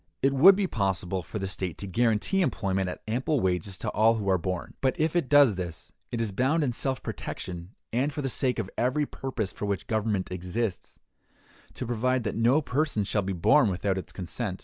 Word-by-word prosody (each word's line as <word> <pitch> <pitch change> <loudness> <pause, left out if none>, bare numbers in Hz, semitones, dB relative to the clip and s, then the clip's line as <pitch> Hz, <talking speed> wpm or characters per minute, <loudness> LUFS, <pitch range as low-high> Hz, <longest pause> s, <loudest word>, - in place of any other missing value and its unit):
It 135 0 +4
would 175 +9 +8
be 200 0 +1
possible 95 - -1
for 100 - -7
the 95 -2 -2
state 95 -3 -4
to - - -6
guarantee 115 - +1
employment 95 - 0
at - - -7
ample 130 +6 0
wages 95 -1 -1
to - - -3
all 110 +2 +4
who 105 -3 -3
are 95 - +3
born. 90 0 -4
But 130 -1 +1
if 155 +2 +1
it 170 -7 +1
does 140 -9 +6
this, 85 -4 -6 0.2
it 120 - -3
is 115 -3 -1
bound 135 +10 +1
in 130 - +1
self 130 +2 -2
protection, 90 +2 -6 0.2
and 130 +5 +1
for 145 0 -4
the - - 0
sake 130 0 0
of 110 -5 -2
every 130 +5 +1
purpose 130 -8 -4
for 105 - -4
which 100 -1 -2
government 110 -4 -1
exists, 90 +3 -3 0.8
to - - -4
provide 125 +2 0
that 105 - -2
no 125 +7 +3
person 140 -5 0
shall 105 +2 0
be 95 0 -3
born 100 - +4
without 95 +1 -1
its - - -9
consent. 95 +1 -4
110 Hz, 210 wpm, -27 LUFS, 95-130 Hz, 0.8 s, would